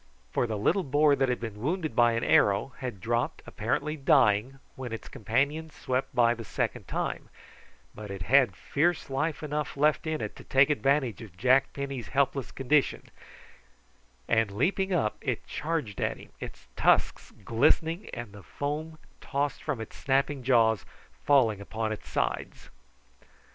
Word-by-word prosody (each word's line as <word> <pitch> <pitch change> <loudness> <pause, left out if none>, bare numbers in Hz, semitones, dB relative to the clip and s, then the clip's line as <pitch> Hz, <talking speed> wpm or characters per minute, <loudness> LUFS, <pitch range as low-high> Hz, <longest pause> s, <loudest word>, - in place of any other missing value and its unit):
For 120 - +1
the 110 -2 -2
little 195 - +2
boar 145 +1 +4
that 135 -1 +1
had 125 - 0
been 110 -3 -6
wounded 155 -1 -2
by 120 -1 +5
an 115 - -1
arrow, 100 +6 +3
had 125 -7 -5
dropped, 120 +4 -1
apparently 140 +7 -2
dying, 130 -3 +3 0.2
when 130 -3 -6
its 115 - -6
companions 145 +7 -1
swept 130 0 -2
by 120 -1 +5
the 115 -1 -7
second - - -3
time, - - -3 0.6
but 105 -1 -9
it 100 -2 -5
had 125 -4 +4
fierce 155 - 0
life 150 +4 -1
enough 150 -1 -3
left 150 +2 +2
in 155 -1 -1
it - - -5
to - - -11
take 135 +2 +4
advantage 135 -6 +1
of 100 -6 -12
Jack 130 +6 +3
Penny's 140 -4 -5
helpless 135 -1 0
condition, 140 +2 0 1.2
and 110 -2 +2
leaping 190 - 0
up 150 -12 +1
it - - -2
charged 150 -10 -3
at - - -1
him, - - -14
its - - -9
tusks - - +2 0.2
glistening, 160 - +2
and 120 -4 -7
the 100 - -11
foam 150 +7 -4 0.2
tossed 145 0 -2
from 150 -6 -3
its 110 - -8
snapping 140 0 0
jaws 115 -5 +3 0.3
falling 115 -8 +2
upon 110 +2 -3
its 110 - -7
sides. - - -3
130 Hz, 160 wpm, -28 LUFS, 115-145 Hz, 1.2 s, by